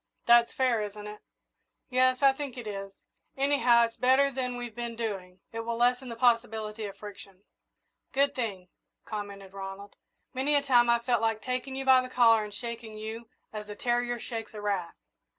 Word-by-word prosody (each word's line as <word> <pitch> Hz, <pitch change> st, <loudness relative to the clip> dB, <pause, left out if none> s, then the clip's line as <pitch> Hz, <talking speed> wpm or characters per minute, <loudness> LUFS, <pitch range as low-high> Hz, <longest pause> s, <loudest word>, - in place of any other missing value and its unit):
That's 235 Hz, 0 st, +6 dB
fair, 250 Hz, -4 st, +1 dB
isn't 210 Hz, 0 st, -6 dB
it?" 210 Hz, 0 st, -9 dB, 0.7 s
"Yes, 255 Hz, +1 st, +3 dB
I 275 Hz, -1 st, +7 dB
think 270 Hz, -2 st, -6 dB
it 240 Hz, -, -6 dB
is. 195 Hz, -2 st, -5 dB, 0.5 s
Anyhow, 270 Hz, -4 st, +4 dB
it's 230 Hz, -, -9 dB
better 265 Hz, +2 st, +4 dB
than 250 Hz, -2 st, -3 dB
we've 240 Hz, -2 st, -6 dB
been 235 Hz, 0 st, -5 dB
doing 190 Hz, -5 st, -5 dB
it 225 Hz, -, -5 dB
will 230 Hz, 0 st, -3 dB
lessen 250 Hz, +2 st, +2 dB
the 230 Hz, -, -5 dB
possibility 225 Hz, -2 st, +1 dB
of 200 Hz, -, -8 dB
friction." 200 Hz, -2 st, -11 dB, 0.7 s
"Good 280 Hz, +1 st, +2 dB
thing," 195 Hz, -7 st, -4 dB, 0.4 s
commented 200 Hz, -2 st, -7 dB
Ronald. 195 Hz, +1 st, -8 dB, 0.4 s
"Many 270 Hz, +3 st, +1 dB
a 285 Hz, -, +3 dB
time 240 Hz, -3 st, +4 dB
I've 235 Hz, 0 st, +2 dB
felt 240 Hz, -3 st, +2 dB
like 225 Hz, -1 st, 0 dB
taking 255 Hz, +1 st, -3 dB
you 270 Hz, 0 st, -4 dB
by 260 Hz, -1 st, +7 dB
the 255 Hz, -, -7 dB
collar 230 Hz, -3 st, +5 dB
and 210 Hz, -, -7 dB
shaking 230 Hz, 0 st, -6 dB
you 220 Hz, +2 st, -6 dB, 0.3 s
as 210 Hz, -1 st, -6 dB
a 210 Hz, -, -6 dB
terrier 240 Hz, +1 st, 0 dB
shakes 225 Hz, -1 st, -6 dB
a 210 Hz, -, -6 dB
rat." 195 Hz, -5 st, -2 dB
235 Hz, 185 wpm, -29 LUFS, 210-250 Hz, 0.7 s, I